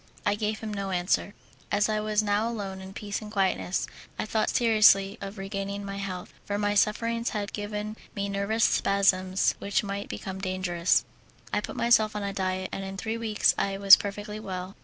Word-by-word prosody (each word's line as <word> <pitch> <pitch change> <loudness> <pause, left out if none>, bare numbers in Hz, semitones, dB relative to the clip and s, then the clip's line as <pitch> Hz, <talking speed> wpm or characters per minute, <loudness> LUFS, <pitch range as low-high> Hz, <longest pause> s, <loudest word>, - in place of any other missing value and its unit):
I 205 - +3
gave 215 +1 -2
him 215 -1 -4
no 200 -1 -3
answer. 185 +2 0 0.4
As 205 0 +3
I 215 -1 0
was 215 0 +1
now 210 +2 +1
alone 195 -4 -5
in 190 0 -9
peace 205 +1 -5
and 210 -1 -8
quietness, 190 -2 0 0.3
I - - -2
thought 215 0 0
seriously 215 -4 +4
of 200 +1 -6
regaining 195 +1 -4
my 200 0 -5
health, 185 -2 -5
for 205 - -2
my 205 0 +1
sufferings 230 +3 +1
had 205 -1 -4
given 210 +1 -4 0.2
me 200 -1 -2
nervous 200 +3 0
spasms 190 -1 +2
which 200 +1 0
might 200 0 -4
become 190 0 -6
dangerous. 185 -2 +1 0.5
I - - +2
put - - -7
myself 220 -3 +3
on 200 -1 -3
diet, 185 -1 -2
and 195 - -4
in 195 0 -6
three 225 +3 -3
weeks 220 -2 +2
I 195 0 0
was 195 0 +10
perfectly 205 +1 -5
well. 185 -2 -6
200 Hz, 185 wpm, -27 LUFS, 195-215 Hz, 0.5 s, was